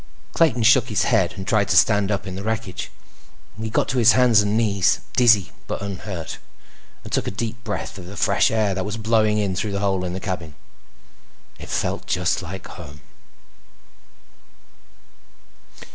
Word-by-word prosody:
Clayton 135 -9 +2
shook 120 +2 +5
his 105 - +1
head - - +2
and 95 - -7
tried 105 -2 +2
to - - +2
stand 105 -2 +4
up 100 -2 -2
in 95 - -6
the 95 - -5
wreckage. 110 -3 -4 0.7
He 110 - -3
got - - 0
to 130 - 0
his 120 0 +6
hands 120 -4 +5
and 105 +1 0
knees, 100 -5 +2
dizzy 115 -6 +4 0.2
but - - -3
unhurt, 95 -3 -6 0.6
and - - -10
took - - 0
a - - +1
deep 115 +3 -5
breath 105 -2 -5
of 90 - -10
the 100 +2 -10
fresh - - +3
air 110 -3 +1
that 95 0 -2
was 105 +3 -4
blowing 110 -1 +2
in 100 -3 -1
through 100 +2 -2
the 100 - -1
hole 95 -2 0
in 90 -1 -3
the 95 - -4
cabin. 90 -6 -5 1.0
It - - -10
felt - - -2
just 90 +1 0
like 95 +1 -8
home. 75 -4 -11
105 Hz, 175 wpm, -22 LUFS, 95-110 Hz, 1.0 s, his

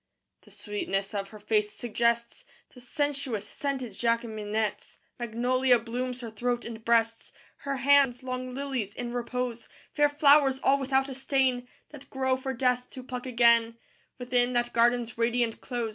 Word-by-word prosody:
II - - -55
The - - -18
sweetness 200 -1 -3
of 200 -1 -3
her 215 - -11
face 210 0 0
suggests 235 - -1 0.3
The 250 - -14
sensuous 270 -5 -2
scented 270 -5 -4
Jacqueminots; 220 -2 -2 0.2
Magnolia 245 +2 +2
blooms 245 +2 -4
her 230 -2 -6
throat 240 +2 -2
and 225 -1 -8
breasts; 230 -1 +1 0.2
Her 280 -1 -3
hands, 270 -1 +4
long 255 0 -4
lilies 265 -7 -3
in 240 -1 -5
repose: 245 -1 -3 0.2
Fair 295 -1 +4
flowers 285 -2 +4
all 275 +1 +4
without 270 0 +1
a 270 - -6
stain, 260 -2 0 0.2
That 295 -2 -12
grow 260 -1 0
for 265 +1 -4
Death 250 0 0
to 255 - -8
pluck 250 0 -6
again, 235 -1 +4 0.4
Within 245 0 0
that 240 0 0
garden's 235 -1 +2
radiant 235 0 0
close. 240 -2 -3
245 Hz, 155 wpm, -28 LUFS, 230-260 Hz, 0.4 s, hands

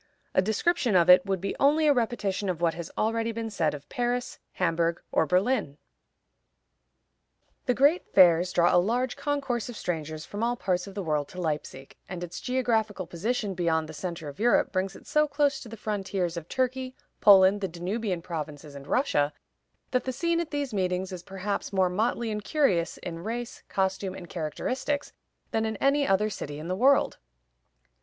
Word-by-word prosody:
A - - +4
description 220 - +1
of 175 0 +7
it 180 +1 +6
would 195 -1 0
be 195 +2 -3
only 300 +3 +4
a 295 - +6
repetition 210 -5 -1
of 175 -3 -2
what 170 -1 +2
has 165 0 -6
already 225 +1 0
been 225 0 -4
said 160 -7 0
of 145 0 -11
Paris, 245 0 -2
Hamburg, 170 -1 0
or 160 - +2
Berlin. 180 - +1 1.9
The 250 - +3
great 290 +7 +3
fairs 175 -1 +6
draw 175 -1 +3
a 175 - +6
large 245 +6 0
concourse 280 -5 -2
of 235 - -7
strangers 155 -2 -4
from 205 - -6
all 240 +1 +1
parts 180 -4 -1
of 195 - -10
the 200 - -3
world 150 -3 0
to 185 - -10
Leipzig, 150 -5 -4
and 180 -1 -5
its 175 0 -7
geographical 225 -6 0
position 205 +4 -2
beyond 165 -3 0
the 155 - -9
centre 165 0 -5
of 140 - -9
Europe 240 +2 +3
brings 190 0 -1
it - - -14
so 300 0 +2
close 285 -1 +1
to 235 - -10
the 225 - -8
frontiers 195 -4 -2
of 170 -1 -7
Turkey, 260 0 -1 0.2
Poland, 195 0 +7
the 195 - 0
Danubian 180 +1 -3
provinces, 150 -4 -6
and 140 0 -10
Russia, 145 - +2 0.6
that 250 - +1
the 260 - -1
scene 335 +6 0
at 340 -2 -2
these 285 -5 -3
meetings 185 -1 -1
is 180 -2 -6
perhaps 195 +3 -4
more 190 -2 +2
motley 225 +4 0
and 210 -1 -3
curious 190 - +1
in 170 -1 -6
race, 235 +3 -5
costume, 190 0 -1
and 175 - -9
characteristics 255 - -3 0.4
than 220 - +1
in 220 0 -2
any 280 +3 +2
other 210 +3 +2
city 145 -6 -6
in 155 +2 -7
the 185 - 0
world. 270 +7 +3
195 Hz, 185 wpm, -27 LUFS, 175-245 Hz, 1.9 s, of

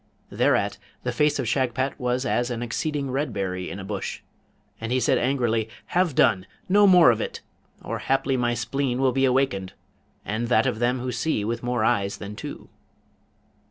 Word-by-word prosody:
Thereat - - +1 0.2
the - - -1
face 150 0 +2
of 130 -4 -2
Shagpat 130 +2 0
was 125 +1 -1
as 120 0 0
an 120 -1 -3
exceeding 140 +3 -2
red 135 0 -1
berry 95 -3 -3
in - - -6
a 100 - -7
bush, 100 0 -5 0.6
and 115 +1 -4
he 130 - +2
said 120 - +2
angrily, 120 -4 0 0.2
'Have 175 -5 +2
done! 95 0 +3 0.2
no 205 +2 +5
more 180 -8 +7
of 115 -1 -1
it! - - -5 0.4
or - - -4
haply 135 0 +1
my 120 -1 +1
spleen 125 +2 -1
will 135 -1 +3
be 135 +1 +2
awakened, 125 -8 0 0.5
and 110 +3 -2
that 125 +2 +3
of 125 -4 -1
them 120 +2 +1
who 125 0 -3
see 120 -3 -1
with 115 +1 -2
more 120 -2 -1
eyes 100 0 +1
than 105 0 -7
two.' - - -8
125 Hz, 185 wpm, -25 LUFS, 110-135 Hz, 0.6 s, more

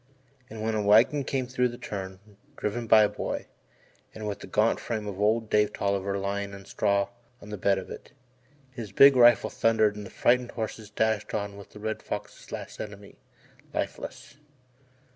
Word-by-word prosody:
And 110 0 -7
when 110 0 0
a 110 - 0
wagon 110 +8 +5
came 130 -2 -2
round 125 -1 +3
the 120 - -9
turn, 95 -5 -6 0.4
driven 115 +3 -3
by 110 0 +7
a - - +4
boy, - - -4 0.7
and 110 -1 -5
with 100 - -4
the - - -9
gaunt 105 +4 +2
frame 110 -3 -3
of 100 -1 -5
old 110 +2 +2
Dave 105 0 +2
Tolliver 100 0 -1
lying 100 0 -3
on 100 -1 -12
straw 100 0 +1 0.3
in 105 - -12
the 105 - -4
bed 100 +1 +3
of 95 - -6
it, - - -10 0.6
his 115 -6 -7
big 140 +7 +8
rifle 120 -3 +6
thundered 110 -2 +2
and 105 - -7
the - - -12
frightened 125 0 +2
horses 110 -2 -5
dashed 110 0 0
on 100 -1 -3
with 100 -1 -12
the - - -11
Red 110 +1 -3
Fox's - - -7
last - - -7
enemy, 100 -1 -9 0.6
lifeless. - - -5
105 Hz, 180 wpm, -27 LUFS, 100-115 Hz, 0.7 s, big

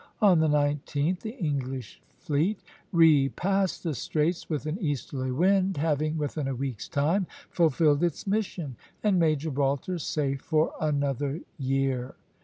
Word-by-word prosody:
On 195 -6 +5
the 160 - +3
19th 150 +3 +1
the 225 +4 -7
English 135 - -3 0.2
fleet 170 +5 0 0.3
repassed 170 +4 +3
the 165 -3 -1
straits 155 +7 -1
with 150 -2 -2
an 155 +6 -3
easterly 140 -4 -2
wind, 185 +6 +2
having 155 +1 0
within 150 -1 -2
a 135 - -2
week's 125 -4 -4
time 165 +5 +1 0.2
fulfilled 155 -2 +3
its 170 -3 -1
mission, 190 - -2 0.3
and 200 -4 +3
made 155 -2 +3
Gibraltar 145 +3 -1
safe 140 -3 -1
for 155 -1 +1
another 145 0 -1 0.2
year. 135 -2 -1
150 Hz, 135 wpm, -27 LUFS, 140-170 Hz, 0.3 s, On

